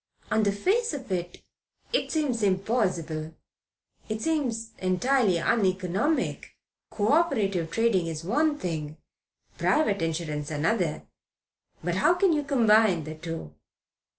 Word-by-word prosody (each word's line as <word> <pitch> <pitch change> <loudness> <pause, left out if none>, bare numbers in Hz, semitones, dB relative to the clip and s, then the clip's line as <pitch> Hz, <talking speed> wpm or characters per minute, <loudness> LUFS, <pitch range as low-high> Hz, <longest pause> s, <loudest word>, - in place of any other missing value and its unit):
"On 220 +1 +3
the 205 -1 +2
face 385 - +1
of 260 -7 -8
it, 175 -1 -4 0.5
it - - 0
seems 285 -8 0
impossible. 185 -6 -1 0.7
It 215 0 -2
seems 235 -6 -1
entirely 190 +2 +2
uneconomic. 190 - 0 0.3
Co 210 0 -1
operative 210 - +2
trading 195 -3 +1
is 160 -1 -4
one 295 - +1
thing; 155 - -4 0.6
private 205 - +2
insurance 155 -3 -2
another. 160 +2 0 0.8
But 175 +1 -1
how 340 - +4
can 365 -1 +3
you 300 - +1
combine 220 - +3
the 155 +1 -6
two?" 160 - -7
200 Hz, 120 wpm, -27 LUFS, 170-250 Hz, 0.8 s, how